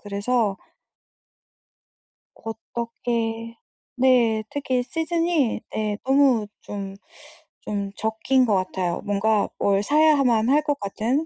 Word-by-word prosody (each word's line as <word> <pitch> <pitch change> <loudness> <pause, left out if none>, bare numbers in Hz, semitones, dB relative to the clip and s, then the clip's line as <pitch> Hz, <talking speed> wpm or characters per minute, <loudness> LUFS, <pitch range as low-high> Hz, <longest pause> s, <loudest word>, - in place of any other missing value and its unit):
그래서 205 0 0 1.8
곧 225 -1 -7 0.2
꺽게 230 -1 -3 0.4
네. 245 -4 +3
특히 260 -3 -1
시즌이 325 -3 0
예 210 -1 -1
너무 265 -5 +3
좀, 195 -1 -6 0.7
좀 200 -1 -3
적기인 225 +4 +1
것 210 -4 +2
같아요. 185 -2 -1
뭔가 205 +1 +1
뭘 200 0 +2
사야만 275 -5 +3
할 295 +2 +4
것 290 -2 -1
같은 230 +9 -1
230 Hz, 180 characters per minute, -23 LUFS, 205-265 Hz, 1.8 s, 할